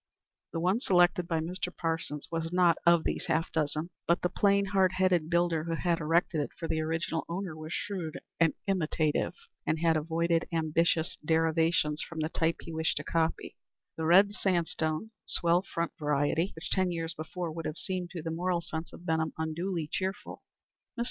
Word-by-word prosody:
The 165 - -2
one 185 +6 +2
selected 180 -5 +3
by 165 -2 0
Mr. 180 +2 -3
Parsons 165 -3 -2
was 165 0 -2
not 175 -2 +4
of 170 -1 +6
these - - -2
half 165 - 0
dozen; 155 +2 -1 0.2
but 170 0 +2
the 180 - +2
plain, 200 +1 +3
hard 190 -1 +2
headed 185 -4 +2
builder 170 -2 +2
who 165 -1 -1
had 170 -1 0
erected 165 +1 +2
it 145 - -3
for 165 - -4
the 160 - 0
original 165 +1 -1
owner 175 -1 -3
was 155 0 -8
shrewd 180 -5 -3 0.2
and 165 -1 +4
imitative, 160 -5 0 0.3
and 155 - 0
had 165 0 +3
avoided 165 +2 +1
ambitious 165 +2 +1
deviations 160 -1 +2
from 165 - -7
the 155 0 0
type 165 0 +1
he 165 - -8
wished 160 0 0
to - - -2
copy 165 -1 -1 0.4
the 160 - -3
red 195 +4 +6
sandstone, 170 0 0 0.2
swell 170 0 +3
front 170 -3 -3
variety, 150 +4 +1
which 160 - -7
ten 185 -2 +2
years 165 -1 -3
before 170 +1 -5
would 165 +1 -4
have 155 - -5
seemed 180 -2 -3
to 170 -2 -6
the 165 - -3
moral 175 +2 0
sense 160 -1 -5
of 175 - -12
Benham 160 -2 0
unduly 160 +1 -2
cheerful. 190 +5 -4 0.6
Mr. - - -6
165 Hz, 180 wpm, -30 LUFS, 160-180 Hz, 0.6 s, of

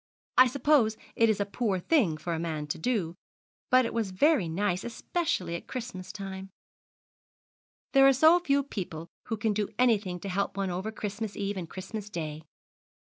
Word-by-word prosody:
I 255 - +8
suppose 250 -4 +3 0.2
it 230 -1 +4
is 210 -2 +1
a 200 - +1
poor 205 -1 -1
thing 185 - +2
for 170 +2 -3
a 160 - -2
man 160 -3 -3
to - - -3
do, 185 -4 0 0.6
but 255 0 +5
it - - -3
was 225 -4 -1
very 190 - +3
nice, 180 +2 -1
especially 235 - -2
at 170 - -6
Christmas 235 -7 -6
time. 195 -2 -7 1.4
There 270 -1 +7
are - - +8
so 315 +6 +6
few 280 -5 +1
people 170 - -6 0.2
who 225 - -3
can 210 0 0
do 205 -1 -1
anything 210 -8 +2
to 200 - -5
help 200 +1 -1
one 195 -2 -1
over 190 +5 -3
Christmas 210 0 -5
Eve 200 0 -2
and 175 -3 -5
Christmas 205 +2 -6
Day. 155 -5 -5
205 Hz, 180 wpm, -29 LUFS, 180-245 Hz, 1.4 s, I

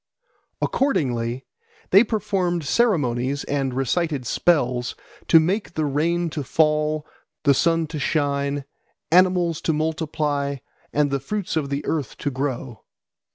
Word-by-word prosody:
Accordingly 125 - 0 0.5
they 195 +4 +8
performed 195 -7 -1
ceremonies 140 - +1
and 140 -2 -1
recited 135 +2 -1
spells 125 -6 +1 0.3
to 165 - +7
make 180 +3 -1
the 155 - 0
rain 165 +4 0
to 150 -2 -3
fall, 150 +1 +1 0.4
the 140 -2 +5
sun 165 +3 +2
to 155 -1 -6
shine, 140 -2 0 0.5
animals 180 -2 +3
to 160 - 0
multiply, 150 -2 -1 0.4
and 145 -1 +1
the 140 - 0
fruits 195 +6 -3
of 150 -3 -1
the 140 +1 -3
earth 150 -7 -2
to 145 - -2
grow. 130 -4 -4
150 Hz, 125 wpm, -23 LUFS, 140-170 Hz, 0.5 s, they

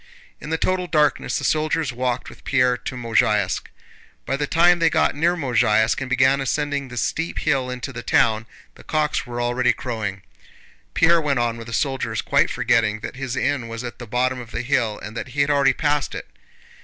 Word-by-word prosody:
In - - -8
the 160 - 0
total 185 +2 0
darkness 150 -3 +1
the - - -4
soldiers 155 -3 0
walked 125 +1 -2
with - - -13
Pierre 125 -2 +2
to 130 - -6
Mozháysk. 105 -5 +1 0.6
By 135 - -1
the 145 +1 -2
time 175 +3 +4
they 165 -1 +4
got - - +2
near 170 +4 +1
Mozháysk 115 -6 +2
and 130 - -4
began 130 +1 +3
ascending 145 0 -1
the 125 -1 -9
steep 165 +8 -2
hill 130 -3 0
into 125 +2 -5
the 120 - -6
town, 110 -1 +2 0.3
the - - -16
cocks 155 -4 -1
were 120 0 -5
already 120 +1 +2
crowing. 105 -6 -4 0.7
Pierre 170 0 +4
went 145 -3 0
on 120 -1 0
with 115 0 -9
the - - -8
soldiers, 135 0 -1
quite - - +2
forgetting 105 -2 +1
that - - -6
his 130 -2 -4
inn 130 -2 -1
was 115 +1 -6
at 120 - -7
the 120 - -8
bottom 125 +3 0
of 120 -2 -9
the - - -4
hill 120 -5 0
and 105 +2 -8
that - - -4
he - - +4
had 140 +1 +2
already 140 -2 +4
passed 145 -2 -1
it. - - -7
130 Hz, 205 wpm, -22 LUFS, 120-145 Hz, 0.7 s, time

